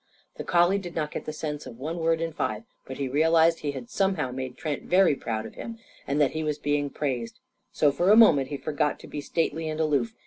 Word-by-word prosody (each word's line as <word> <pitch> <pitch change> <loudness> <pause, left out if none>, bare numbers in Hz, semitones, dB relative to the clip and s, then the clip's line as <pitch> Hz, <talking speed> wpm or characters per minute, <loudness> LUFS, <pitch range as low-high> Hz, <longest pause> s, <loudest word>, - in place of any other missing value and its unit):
The - - -4
collie 175 +3 +3
did 175 -3 -8
not 150 -2 -2
get - - -5
the - - -3
sense 150 -1 -5
of 115 - -10
one 160 +6 -4
word 165 0 +1
in 165 -1 -2
five. 110 -8 -2 0.2
But 130 - -7
he 140 - -2
realised 165 +4 +3
he 145 -1 -3
had 130 -3 -7
somehow 190 -9 0
made 130 0 -5
Trent 150 -3 -3
very 185 -3 +4
proud 110 -4 -4
of 110 - -9
him 230 -1 -7 0.3
and 140 +2 0
that 145 -3 +3
he 160 0 -3
was 150 -1 -1
being 145 -1 0
praised. 125 -6 -3 0.3
So 145 - +3
for 175 +6 +1
a 210 - +8
moment 150 - +6
he 145 - -4
forgot 150 0 -1
to - - -11
be 145 - -5
stately 165 +1 -1
and 155 0 -4
aloof. 145 -7 +1
150 Hz, 240 wpm, -26 LUFS, 140-165 Hz, 0.3 s, a